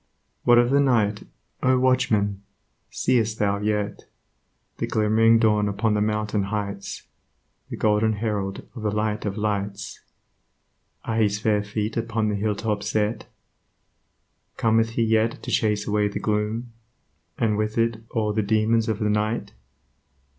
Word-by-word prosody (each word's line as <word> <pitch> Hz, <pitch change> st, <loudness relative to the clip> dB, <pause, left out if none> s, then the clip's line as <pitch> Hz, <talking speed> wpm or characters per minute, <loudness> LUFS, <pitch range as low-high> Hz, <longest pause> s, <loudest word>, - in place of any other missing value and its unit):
What 120 Hz, 0 st, +6 dB
of 120 Hz, +1 st, +4 dB
the 140 Hz, -, +4 dB
night, 110 Hz, -7 st, +1 dB, 0.3 s
O 130 Hz, 0 st, +3 dB
Watchman! 115 Hz, -6 st, +1 dB, 0.5 s
see'st 115 Hz, -3 st, +1 dB
thou 100 Hz, -1 st, +1 dB
yet 105 Hz, 0 st, -2 dB, 0.7 s
The -, -, -1 dB
glimmering 110 Hz, +1 st, +4 dB
dawn 105 Hz, -2 st, +2 dB
upon 105 Hz, +2 st, 0 dB
the 105 Hz, -, +1 dB
mountain 105 Hz, -1 st, 0 dB
heights, 100 Hz, -1 st, -4 dB, 0.7 s
The -, -, -5 dB
golden 110 Hz, +1 st, +2 dB
Herald 105 Hz, -2 st, -3 dB
of 115 Hz, -, -7 dB
the 105 Hz, -, 0 dB
Light 105 Hz, +1 st, -1 dB
of 100 Hz, 0 st, -3 dB
lights, 105 Hz, -1 st, -3 dB, 1.1 s
Are 110 Hz, -, -2 dB
his 105 Hz, -2 st, +2 dB
fair 105 Hz, -1 st, +1 dB
feet 105 Hz, +2 st, -3 dB
upon 115 Hz, -1 st, -1 dB
the 105 Hz, -, -1 dB
hilltops 105 Hz, 0 st, -1 dB
set? 110 Hz, 0 st, -1 dB, 1.3 s
Cometh 115 Hz, 0 st, +2 dB
he 115 Hz, -, +1 dB
yet 110 Hz, 0 st, +1 dB
to -, -, -5 dB
chase 105 Hz, -2 st, +1 dB
away 105 Hz, 0 st, +2 dB
the 100 Hz, -, -4 dB
gloom, 110 Hz, +3 st, -2 dB, 0.6 s
And 110 Hz, -2 st, +1 dB
with 110 Hz, +1 st, -2 dB
it 115 Hz, -1 st, +1 dB
all 110 Hz, -3 st, -1 dB
the 110 Hz, -, +1 dB
demons 110 Hz, +2 st, +1 dB
of 110 Hz, -, 0 dB
the 105 Hz, -1 st, -1 dB
Night? 105 Hz, +2 st, -1 dB
110 Hz, 145 wpm, -24 LUFS, 105-115 Hz, 1.3 s, What